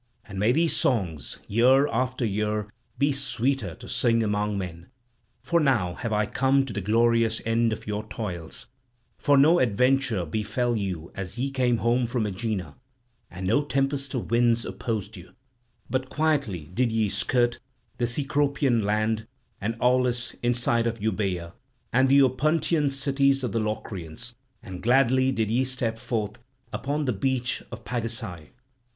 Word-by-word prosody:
And 95 -2 -7
may 105 +4 +4
these 165 +5 +2
songs 85 - -1
year 130 +6 +4
after 130 +1 -1
year 105 0 -1 0.3
be 140 +1 +3
sweeter 135 - -1
to - - -12
sing 115 -1 +2
among 105 -1 0
men. 85 -2 -6 0.6
For 170 - +2
now 120 - +2
have 115 - -4
I 105 0 +2
come 135 +4 +2
to 125 - -6
the 105 - -2
glorious 115 +2 +2
end 115 0 +2
of 110 - -5
your 105 0 -3
toils; 100 -1 -5 0.5
for 145 -2 +4
no 160 +6 +6
adventure 125 -3 +2
befell 110 +7 -1
you 90 -6 -3
as 95 +3 -6
ye 135 +3 -1
came 125 -3 +2
home 120 +2 +1
from 120 -2 -1
Aegina, 95 -6 -3 0.5
and 90 +2 -7
no 145 +10 +3
tempest 140 -1 -1
of 120 - -4
winds 120 0 +3
opposed 110 -6 -4
you; 90 - -13 0.5
but 130 +1 -2
quietly 140 - 0
did 120 +2 +1
ye 110 -1 +2
skirt 120 +4 +1 0.4
the 120 - +1
Cecropian 140 -1 +1
land 110 +1 0 0.3
and 115 +3 -1
Aulis 125 -1 +2
inside 120 -1 +1
of 115 0 -3
Euboea 95 -5 -2 0.4
and 130 +2 +4
the 140 +1 +7
Opuntian 150 +3 +2
cities 140 0 +1
of 125 - -1
the 115 - 0
Locrians, 105 0 -4 0.3
and 90 -1 -8
gladly 130 +2 +4
did 110 -4 -1
ye 125 +3 +2
step 125 -3 -2
forth 105 -3 -3 0.3
upon 145 +2 -2
the 125 - +1
beach 125 +4 -1
of 120 -1 -9
Pagasae. 115 -8 -4
115 Hz, 155 wpm, -26 LUFS, 105-130 Hz, 0.6 s, the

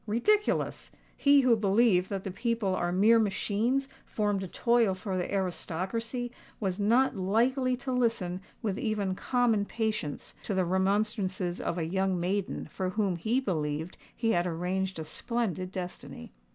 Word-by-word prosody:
Ridiculous! 405 - +1 0.3
He 280 0 +5
who 250 -3 +5
believed 200 -2 +3
that 195 -1 -3
the 195 - -4
people 230 -2 -1
are 175 -1 0
mere 215 +6 +5
machines 225 +5 0 0.2
formed 205 -2 -1
to 190 - -4
toil 235 0 +2
for 190 0 -4
the 180 -1 -2
aristocracy, 200 +6 -2 0.3
was 190 -2 -2
not 235 +6 +3
likely 245 +7 +1
to 260 +1 -4
listen 225 -8 0 0.2
with 205 -1 -1
even 205 -4 -1
common 235 0 +1
patience 215 -9 -3
to 200 - -3
the 185 -1 +2
remonstrances 190 -1 0
of 170 - -2
a 165 - -1
young 190 +1 0
maiden 190 +3 -1
for 185 -1 -3
whom 195 -2 0
he 220 +9 +1
believed 160 - -2 0.2
he 225 -1 +1
had 175 -2 +2
arranged 185 +2 -2
a 160 - -5
splendid 185 -2 -3
destiny. 180 - -7
200 Hz, 150 wpm, -29 LUFS, 185-230 Hz, 0.3 s, He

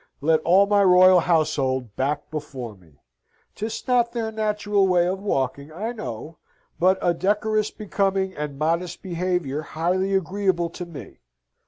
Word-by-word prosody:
Let 155 +2 +2
all 185 +5 +5
my 205 0 +3
royal 185 0 +7
household 135 - 0
back 145 +2 -2
before 135 -7 -6
me. 80 -7 -24 0.5
'Tis 220 +4 -5
not 240 -2 +2
their 225 -2 -2
natural 210 -2 0
way 180 -2 +3
of 185 +2 -1
walking, 140 -5 -2
I 210 +9 -4
know: 160 - -7 0.4
but 185 +2 +4
a 175 - +3
decorous, 210 +4 0
becoming, 195 -2 -1
and 150 -2 -5
modest 170 +4 -1
behaviour 175 -5 -2
highly 185 +5 -1
agreeable 190 -2 0
to 175 0 -7
me. 160 -5 -11
180 Hz, 145 wpm, -23 LUFS, 155-200 Hz, 0.5 s, royal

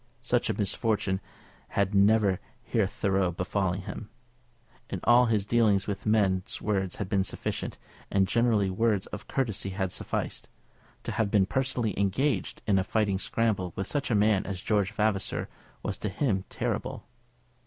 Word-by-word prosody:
Such - - +1
a - - -1
misfortune 100 -1 0 0.6
had 100 0 +2
never 100 -1 +4 0.2
hitherto 95 -4 +1
befallen 95 +1 -1
him. 105 +3 -7 0.8
In - - -3
all 120 +1 +6
his 110 -3 +1
dealings 110 -4 +3
with 100 +1 -4
men 100 -4 +3 0.2
words 95 -4 -1
had 100 - -4
been 95 -1 +2
sufficient, - - -4 0.3
and 95 -1 +3
generally 110 -5 +2
words 105 -1 +1
of 105 - -6
courtesy 110 -7 -1
had 95 -1 -2
sufficed. - - -3 0.5
To - - -3
have 110 -3 0
been 100 -2 +4
personally 125 -1 0
engaged 100 +4 0
in 100 -2 +3
a - - +1
fighting 100 -2 +1
scramble 100 -6 0
with 95 - -2
such 145 +4 -1
a 115 - +2
man 105 -1 +3
as 95 -2 -4
George 100 -2 +1
Vavasor 105 -3 0 0.4
was - - -3
to 105 - -2
him 95 -3 0
terrible. - - -3
100 Hz, 155 wpm, -28 LUFS, 95-110 Hz, 0.8 s, all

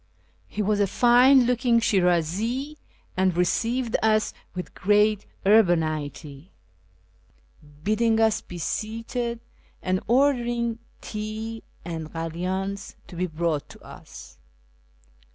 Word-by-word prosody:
He 210 - -3
was 205 +1 +1
a 200 - +3
fine 250 +5 +5
looking 240 -1 +2
Shirazi, 205 - 0 0.4
and 185 -1 +1
received 230 +7 0
us 215 -1 +2 0.2
with 180 - -6
great 210 +1 +2 0.2
urbanity, 160 -6 +1 1.3
bidding 220 +3 +2
us 220 -1 +3
be 175 - -10
seated, 230 +5 -3 0.4
and 185 0 0
ordering 240 -2 +1 0.2
tea 220 +1 -5 0.2
and 160 -2 -5
kalyans 185 +4 -4
to - - -10
be 180 +2 -1
brought 160 -2 -2
to - - -13
us. - - -13
210 Hz, 100 wpm, -25 LUFS, 175-230 Hz, 1.3 s, fine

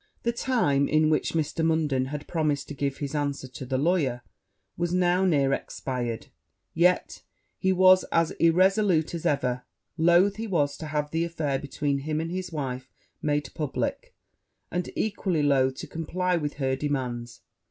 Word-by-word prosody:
The 235 - +2
time 185 - +1
in 155 0 +3
which 155 - +1
Mr. 160 0 -1
Munden 155 -5 +1
had 145 +2 -5
promised 150 -4 -1
to - - -5
give 140 -1 -2
his 140 -1 -4
answer 145 -2 -2
to 130 +1 -8
the 130 0 0
lawyer 140 -6 +1 0.5
was 175 0 -1
now 180 +1 +2
near 140 -6 +3
expired; 120 -4 -3 0.5
yet 180 +2 +2 0.4
he 190 - +2
was 185 0 +6
as 165 -1 +1
irresolute 180 0 +3
as 170 - -2
ever: 125 -3 0 0.4
loath 175 +5 +4
he 225 +1 -4
was 145 -7 +1
to 160 - -6
have 150 0 -2
the 165 +1 0
affair 155 -5 -1
between 140 0 -2
him 155 +2 -2
and 165 +1 -3
his 185 0 -4
wife 130 -4 -4 0.3
made 145 -2 -1
publick, 150 -4 -3 0.6
and 180 0 -2
equally 190 -7 0
loath 130 -2 +3
to - - -7
comply 180 +3 -1
with 150 -3 -2
her 135 -2 0
demands. 125 -5 -3
150 Hz, 165 wpm, -26 LUFS, 140-175 Hz, 0.6 s, was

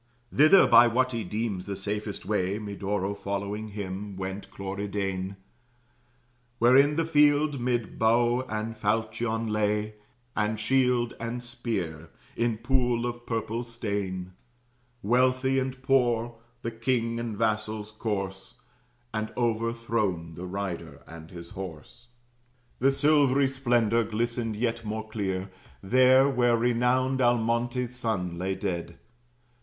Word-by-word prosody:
Thither 155 +7 +7
by 120 +1 +7
what 130 +2 +1
he 115 -2 -2
deems 105 -1 -3
the 100 - -3
safest 105 +1 -4
way 100 -1 0
(Medoro 100 -1 -2
following 100 +2 -4
him) 100 -1 -6
went 95 +1 -5
Cloridane 95 -1 -3 1.2
Where 120 +2 +5
in 145 +2 +5
the 165 +1 +1
field, 145 -2 +3
'mid 120 -2 -2
bow 120 +2 +3
and 110 +1 -3
falchion 110 +2 -1
lay, 105 0 0 0.4
And 105 0 0
shield 125 0 +2
and 115 +1 -4
spear, 105 -10 -4 0.3
in 115 -2 0
pool 120 0 +1
of 120 0 -5
purple 115 0 -2
stain, 100 -6 -4 0.7
Wealthy 130 +4 +3
and 130 0 -3
poor, 120 -3 +2 0.3
the 115 - -2
king 115 0 -1
and 115 -3 -4
vassal's 110 -1 -1
corse, 100 0 -4 0.6
And 110 0 -2
overthrown 115 -7 -1
the 90 +3 -7
rider 95 -2 -5
and 80 -1 -11
his 85 -1 -10
horse. 95 +4 -9 0.7
The 135 - +4
silvery 140 -1 +4
splendor 120 -4 +2
glistened 115 +1 -2
yet 115 +1 -1
more 110 0 -4
clear, 95 -3 -3 0.3
There 130 +5 +5
where 120 -3 +3
renowned 125 +3 +2
Almontes's 120 +1 +1
son 90 -8 -2
lay 95 +1 -1
dead. 85 -4 -4
115 Hz, 120 wpm, -27 LUFS, 100-120 Hz, 1.2 s, Thither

